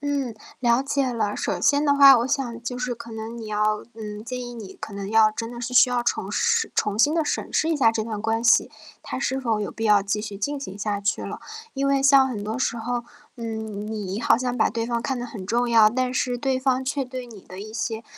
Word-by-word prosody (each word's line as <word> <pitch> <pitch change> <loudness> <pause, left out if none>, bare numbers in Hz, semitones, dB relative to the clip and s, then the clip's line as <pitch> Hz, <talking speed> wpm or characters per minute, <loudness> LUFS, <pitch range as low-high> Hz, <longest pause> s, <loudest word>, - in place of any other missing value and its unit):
嗯， 285 -4 -1 0.3
了 240 0 +3
解 275 -1 0
了。 215 -3 -1
首 - - -2
先 290 +1 +3
的 285 - +4
话， 275 -2 +8
我 235 - 0
想 260 -4 -2
就 245 +1 -4
是 250 0 -2
可 235 0 -11
能 225 +1 -6
你 225 -2 -7
要 215 0 0
嗯， 210 -1 -7
建 250 +1 -5
议 245 -1 -7
你 215 -5 -9
可 - - -7
能 200 0 -5
要 220 0 +6
真 230 +1 -5
的 240 0 -8
是 250 +1 -4
需 250 - +7
要 245 -1 0
重 210 -4 -1
视 - - +1
重 210 -1 0
新 290 +7 +4
地 325 -1 +1
审 - - -3
视 315 - +2
一 325 - +1
下 245 -6 +5
这 225 -1 -2
段 215 -2 -5
关 225 +1 0
系， 235 - +4 0.3
它 - - -5
是 265 0 -1
否 230 -4 0
有 205 - -4
必 225 - -5
要 210 -1 +5
继 205 +2 -2
续 210 -2 -6
进 285 +8 -2
行 205 -8 -8
下 205 -1 -2
去 205 +1 -1
了。 - - -6 0.3
因 275 0 0
为 275 0 +3
像 275 -1 +6
很 215 -5 -5
多 220 +3 -3
时 260 -2 -1
候， 240 +1 -2 0.3
嗯， 220 -3 -5
你 210 -1 -4
好 230 - +4
像 250 -1 -2
把 220 - +2
对 230 +1 -2
方 235 -1 -1
看 265 0 -2
得 245 - -4
很 215 -5 -8
重 240 +5 0
要， 225 -2 +6
但 255 +1 -1
是 250 -1 0
对 265 0 0
方 260 0 +1
却 275 +1 -1
对 255 0 -7
你 225 -4 -12
的 185 0 -12
一 215 +1 -8
些 225 0 -3
235 Hz, 275 characters per minute, -24 LUFS, 215-255 Hz, 0.3 s, 话